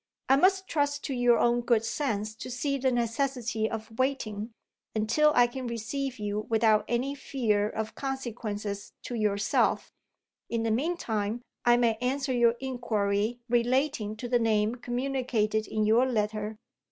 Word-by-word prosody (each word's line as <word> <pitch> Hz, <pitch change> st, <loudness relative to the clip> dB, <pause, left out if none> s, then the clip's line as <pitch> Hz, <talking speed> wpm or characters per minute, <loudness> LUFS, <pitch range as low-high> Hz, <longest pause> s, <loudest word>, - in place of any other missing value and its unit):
I 270 Hz, -, +7 dB
must 375 Hz, +5 st, +3 dB
trust 285 Hz, -2 st, 0 dB
to 275 Hz, -, -3 dB
your 245 Hz, -1 st, +4 dB
own 240 Hz, 0 st, +3 dB
good 235 Hz, -2 st, +2 dB
sense 225 Hz, -4 st, -2 dB
to 255 Hz, -, -7 dB
see 275 Hz, +3 st, -1 dB
the 260 Hz, 0 st, +2 dB
necessity 235 Hz, -2 st, -1 dB
of 225 Hz, +1 st, -7 dB
waiting, 230 Hz, -5 st, -1 dB, 0.5 s
until 230 Hz, +8 st, +3 dB
I 245 Hz, -, +7 dB
can 250 Hz, +1 st, -5 dB
receive 240 Hz, +3 st, -3 dB
you 210 Hz, 0 st, -3 dB
without 220 Hz, -1 st, +3 dB
any 250 Hz, +4 st, 0 dB
fear 220 Hz, -7 st, 0 dB
of 220 Hz, 0 st, -4 dB
consequences 220 Hz, -7 st, -4 dB
to -, -, -6 dB
yourself. 210 Hz, -2 st, +1 dB, 0.6 s
In 230 Hz, -1 st, -1 dB
the 225 Hz, -, +1 dB
meantime, 230 Hz, -5 st, -1 dB, 0.2 s
I 240 Hz, 0 st, +6 dB
may 230 Hz, -2 st, +2 dB
answer 265 Hz, +2 st, 0 dB
your 240 Hz, -1 st, +4 dB
inquiry 235 Hz, -3 st, -1 dB
relating 240 Hz, -2 st, +1 dB
to 245 Hz, -, -5 dB
the 245 Hz, 0 st, +2 dB
name 220 Hz, -1 st, +2 dB
communicated 245 Hz, -4 st, -1 dB
in 215 Hz, -1 st, 0 dB
your 230 Hz, +4 st, +4 dB
letter. 215 Hz, -2 st, -1 dB
235 Hz, 150 wpm, -28 LUFS, 215-260 Hz, 0.6 s, I